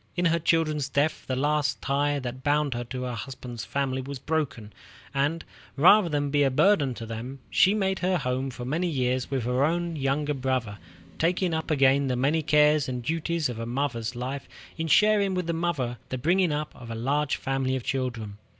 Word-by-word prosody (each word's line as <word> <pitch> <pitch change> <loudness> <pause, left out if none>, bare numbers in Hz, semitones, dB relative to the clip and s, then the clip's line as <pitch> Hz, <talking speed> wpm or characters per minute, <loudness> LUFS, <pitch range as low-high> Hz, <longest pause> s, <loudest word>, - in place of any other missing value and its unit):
In 175 0 0
her 170 0 +3
children's 155 -3 +1
death 145 +3 0
the 130 - -1
last 145 +1 +1
tie 145 +1 0
that 130 -1 -5
bound 145 -1 +1
her 120 0 -3
to 125 +2 -5
her 125 -1 -3
husband's 120 -1 -7
family 135 -1 -1
was 140 +1 -6
broken, 125 -8 -3 0.4
and, 145 +4 0 0.3
rather 180 +5 +6
than 145 -2 -1
be 145 0 +2
a 140 - +4
burden 140 -2 +3
to 115 - -7
them, 115 +4 -6
she 195 +3 +4
made 190 -2 0
her 185 0 +1
home 130 -2 -2
for 125 -1 -7
many 160 +8 0
years 130 -4 -1
with 135 -3 -1
her 125 +3 +1
own 170 +2 0
younger 145 +1 0
brother, 130 -6 -2 0.4
taking 175 +1 +1
up 160 +1 -2
again 140 -2 +3
the 130 - 0
many 140 +6 +1
cares 150 -1 +3
and 125 -1 -4
duties 165 +2 -1
of 120 -2 -5
a 115 - -4
mother's 125 -2 -2
life 130 +3 -5 0.3
in 160 0 -3
sharing 205 +2 +4
with 180 -1 -1
the 170 - -1
mother 150 -8 -2
the 130 - -3
bringing 175 +6 +2
up 150 0 -3
of 120 -1 -11
a 115 - -4
large 140 +5 0
family 135 -1 -1
of 130 - -3
children. 115 -8 -3
140 Hz, 200 wpm, -26 LUFS, 125-160 Hz, 0.4 s, rather